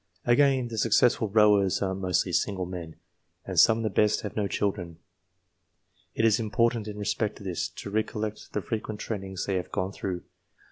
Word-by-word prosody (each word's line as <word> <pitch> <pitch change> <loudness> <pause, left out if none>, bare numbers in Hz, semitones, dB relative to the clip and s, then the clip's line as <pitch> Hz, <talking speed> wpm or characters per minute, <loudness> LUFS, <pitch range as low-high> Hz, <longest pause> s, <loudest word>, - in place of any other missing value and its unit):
Again, 130 0 +3
the 110 -1 -4
successful 115 0 +3
rowers 105 -2 +4
are 95 -1 0
mostly 95 -2 0
single 95 -3 0
men, 85 -3 -7 0.5
and - - 0
some 110 - +6
of 115 - -3
the 110 - +1
best 105 +1 +2
have 105 - -6
no 105 -2 0
children. 90 -3 -2 1.2
It 115 - +2
is 110 0 +4
important, 115 0 +1
in 105 -1 -6
respect 105 +1 -1
to - - -12
this, 90 -3 -2
to 100 - -8
recollect 110 0 -3
the 105 - -2
frequent 110 -1 -4
trainings 95 -4 -4
they 95 -2 0
have 90 - -5
gone 95 +1 -2
through. 95 -2 -4
105 Hz, 180 wpm, -27 LUFS, 95-110 Hz, 1.2 s, some